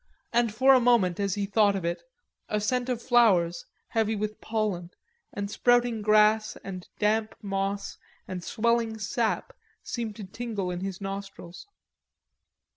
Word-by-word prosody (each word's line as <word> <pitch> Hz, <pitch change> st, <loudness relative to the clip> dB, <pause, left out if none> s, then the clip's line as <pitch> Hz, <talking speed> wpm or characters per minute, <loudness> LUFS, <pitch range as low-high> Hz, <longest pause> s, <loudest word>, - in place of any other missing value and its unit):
And 235 Hz, -1 st, +3 dB
for 260 Hz, +5 st, +5 dB
a 260 Hz, -, +6 dB
moment 230 Hz, -8 st, +3 dB
as 200 Hz, -2 st, 0 dB
he 205 Hz, -1 st, -1 dB
thought 205 Hz, 0 st, +3 dB
of 190 Hz, -3 st, -3 dB
it 170 Hz, 0 st, -2 dB, 0.5 s
a 210 Hz, -, 0 dB
scent 245 Hz, +4 st, -1 dB
of 245 Hz, -3 st, -1 dB
flowers, 185 Hz, -9 st, +3 dB, 0.2 s
heavy 220 Hz, -1 st, +1 dB
with 215 Hz, +1 st, -4 dB
pollen, 210 Hz, -6 st, -2 dB, 0.4 s
and 200 Hz, 0 st, -4 dB
sprouting 245 Hz, 0 st, +2 dB
grass 215 Hz, +1 st, +4 dB
and 185 Hz, -2 st, -7 dB
damp 215 Hz, +1 st, +1 dB
moss 195 Hz, 0 st, -3 dB, 0.3 s
and 185 Hz, -2 st, -5 dB
swelling 235 Hz, 0 st, 0 dB
sap, 220 Hz, +2 st, -1 dB, 0.3 s
seemed 230 Hz, -3 st, -4 dB
to 210 Hz, -, -8 dB
tingle 205 Hz, -2 st, -4 dB
in 175 Hz, -, -4 dB
his 190 Hz, 0 st, -5 dB
nostrils. 195 Hz, -, -7 dB
210 Hz, 145 wpm, -27 LUFS, 195-230 Hz, 0.5 s, a